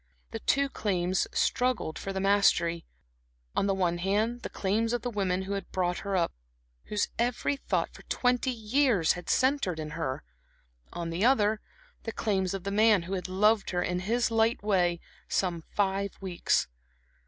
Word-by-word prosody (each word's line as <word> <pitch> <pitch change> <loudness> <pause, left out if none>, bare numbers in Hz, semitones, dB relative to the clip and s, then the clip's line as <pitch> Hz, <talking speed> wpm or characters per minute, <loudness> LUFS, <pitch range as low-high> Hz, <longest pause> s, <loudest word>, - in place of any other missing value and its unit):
The 225 - -4
two 280 +5 +2
claims 185 -7 0
struggled 250 -10 0
for 195 - -4
the 190 - -2
mastery; 190 -4 +2 0.7
on 195 - +2
the 195 - +2
one 175 -2 0
hand, 215 +6 0
the - - -5
claims 220 +4 0
of 240 -2 -1
the 245 - -2
women 190 -3 0
who 195 +1 -4
had 195 -2 -5
brought 180 -1 0
her 200 -1 -1
up, 170 - +1 0.5
whose 210 - -1
every 245 +4 +1
thought 275 - -2
for - - -13
twenty 250 +1 +1
years 230 - +2
had 175 - -8
centred 255 - +2
in 155 -1 -5
her; 150 -4 -3 0.7
on 170 -1 -4
the 170 +4 -1
other, 220 -4 +3 0.4
the 225 - -4
claims 195 -4 -1
of 190 - -6
the 200 - -3
man 210 -2 +4
who 185 +3 -5
had 185 -1 -3
loved 210 +3 +3
her 175 -1 0
in 180 0 -1
his 230 +5 0
light 225 -1 +2
way 180 -4 +2 0.3
some 175 -3 0
five 200 0 0
weeks. 185 -3 0
200 Hz, 175 wpm, -29 LUFS, 180-225 Hz, 0.7 s, man